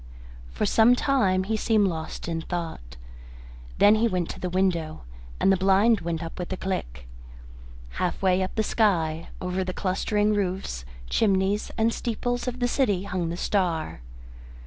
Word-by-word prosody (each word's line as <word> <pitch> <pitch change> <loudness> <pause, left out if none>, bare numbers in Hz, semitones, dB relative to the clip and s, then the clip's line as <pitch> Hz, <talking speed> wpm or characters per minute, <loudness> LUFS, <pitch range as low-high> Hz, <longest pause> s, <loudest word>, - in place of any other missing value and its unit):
For - - -2
some 230 +2 +5
time 200 -9 +2
he 220 +3 -1
seemed 215 -1 +2
lost 160 -2 -5
in 165 -1 -2
thought. 160 - -6 0.8
Then 205 - +6
he 220 +2 +3
went 180 -5 -1
to - - -9
the 180 - -3
window, 175 -4 -1 0.4
and 195 - +4
the 195 - +3
blind 195 +3 +4
went 170 0 -3
up 165 - -8
with 180 - -5
a 190 - -2
click. 65 - -4 0.9
Half 180 - -1
way 185 -1 +2
up 185 - -3
the 220 - +1
sky, 170 -8 +1
over 180 +1 -2
the 185 0 -4
clustering 205 +3 0
roofs, 185 - -2 0.2
chimneys, 195 - +1
and 225 +1 +2
steeples 245 +1 -2
of 250 0 -3
the 245 - +1
city, 210 -8 +1
hung 180 -4 -2
the 170 - -4
star. 170 - -1
190 Hz, 165 wpm, -26 LUFS, 170-210 Hz, 0.9 s, Then